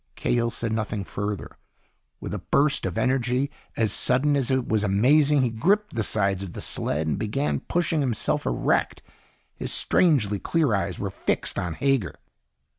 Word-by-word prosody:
Cahill 120 -1 0
said 115 -1 -3
nothing 110 -2 -2
further. 105 +1 -5 0.6
With - - -6
a - - -3
burst 145 -6 +1
of 90 - -5
energy 130 +2 0 0.3
as 110 -3 +1
sudden 140 +4 +2
as 135 -4 0
it 130 -2 0
was 110 -1 0
amazing, 135 +8 +3
he 120 - 0
gripped 200 - +1
the 115 - -1
sides 100 -3 +1
of 95 -3 -7
the - - -7
sled 75 +2 0
and 80 +5 -2
began 115 +7 -1
pushing 170 -3 -1
himself 125 -6 0
erect. - - 0 0.5
His - - -2
strangely 120 - +3
clear 155 - 0
eyes 95 -2 -1
were 100 -1 -4
fixed - - -1
on 85 -2 -3
Hager. 135 - 0
115 Hz, 165 wpm, -24 LUFS, 100-140 Hz, 0.6 s, amazing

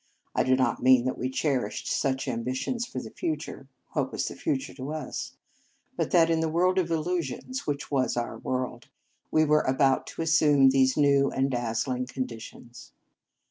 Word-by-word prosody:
I - - +2
do 130 - +3
not 130 -2 0
mean 130 -1 +5
that 130 - 0
we 130 - -1
cherished 130 -5 -1
such 135 -2 0
ambi 125 0 -2
tions 240 - -2
for - - -9
the - - -8
future, 330 -3 -4 0.2
what - - -1
was - - -2
the - - -6
future 280 -5 -2
to 135 +2 -6
us? 155 -4 -5 0.6
but - - -1
that 165 -1 +4
in 165 - +2
the 160 0 0
world 180 +3 +2
of 175 -2 -1
illusions, 170 - -2
which 145 0 -3
was 130 -3 +1
our 120 -1 -3
world, 130 +1 -3 0.4
we 155 0 +3
were 150 0 +4
about 135 0 +2
to - - -4
assume 150 -4 +5
these 130 0 +3
new 140 -2 +4
and 135 +1 0
dazzling 125 +1 -1
conditions. 120 -1 -8
135 Hz, 180 wpm, -27 LUFS, 130-160 Hz, 0.6 s, mean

